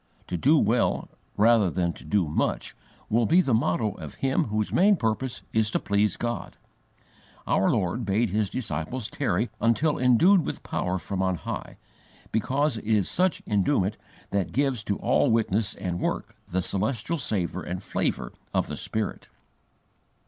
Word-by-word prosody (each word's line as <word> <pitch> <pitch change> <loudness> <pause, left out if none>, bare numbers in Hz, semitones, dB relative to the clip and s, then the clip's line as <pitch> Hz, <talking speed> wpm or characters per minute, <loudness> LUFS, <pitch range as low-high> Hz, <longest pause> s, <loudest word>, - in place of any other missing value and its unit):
To 90 - -4
do 145 - +4
well, 115 -1 +1 0.3
rather 110 -2 +5
than 85 0 -1
to - - -14
do 85 +2 +1
much, 75 - -1 0.3
will 115 +1 +2
be 170 +3 +5
the 135 -9 +2
motto 110 -1 +1
of 80 -6 -9
him 135 0 +1
whose 110 -1 -2
main 200 +3 +5
purpose 120 - -2
is 110 -1 +2
to - - 0
please 100 -1 +1
God. 120 0 -4 0.9
Our - - +2
Lord 95 +7 0
bade 105 +1 +1
His 105 -1 +1
disciples 105 - -3
tarry 125 -3 0
until 145 +7 +2
endued 155 - +5
with - - -5
power 90 +1 -1
from 95 +1 -3
on 95 -1 +1
high, 75 - -6 0.5
because 135 +5 +1
it 110 - -8
is 105 -4 +2
such 185 -1 +1
enduement 100 -1 +1 0.4
that 100 -2 0
gives 135 -5 0
to 100 - -1
all 145 - +2
witness 110 -2 +1
and 90 -2 -3
work - - -3
the 95 +1 0
celestial 110 - -1
savour 95 - -1
and 90 +2 -5
flavour 60 0 -2 0.2
of - - +2
the - - -6
Spirit. 110 -2 -3
110 Hz, 160 wpm, -26 LUFS, 95-125 Hz, 0.9 s, rather